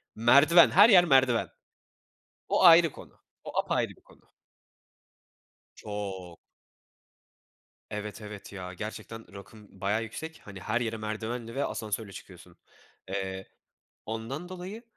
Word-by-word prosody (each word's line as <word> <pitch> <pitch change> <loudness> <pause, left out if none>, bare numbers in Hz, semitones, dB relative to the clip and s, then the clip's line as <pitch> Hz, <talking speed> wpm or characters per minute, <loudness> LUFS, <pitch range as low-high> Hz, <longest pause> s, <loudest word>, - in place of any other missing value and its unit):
merdiven, 140 +9 +6
her 205 +5 +7
yer 180 -4 +7
merdiven. 130 -5 +3 1.0
O - - +2
ayrı 170 -2 +8
konu, - - -15 0.2
o - - -3
apayrı - - 0
bir - - -16
konu. - - -22 1.5
Çok. 95 -5 -7 1.5
Evet, 105 0 -6
evet 105 -1 -10
ya. 90 -2 -7
Gerçekten 110 0 -8
rakım 100 +2 -13
bayağı 105 +3 0
yüksek. 160 +9 -8
Hani, 100 -2 -10
her 110 +5 -1
yere 115 -1 -2
merdivenle 110 +2 -5
ve 140 - 0
asansörle 105 -1 -4
çıkıyorsun. - - -13 0.5
Eee, 95 0 -4 0.6
ondan 115 +10 -5
dolayı, 185 +5 -8
110 Hz, 115 wpm, -28 LUFS, 100-140 Hz, 1.5 s, ayrı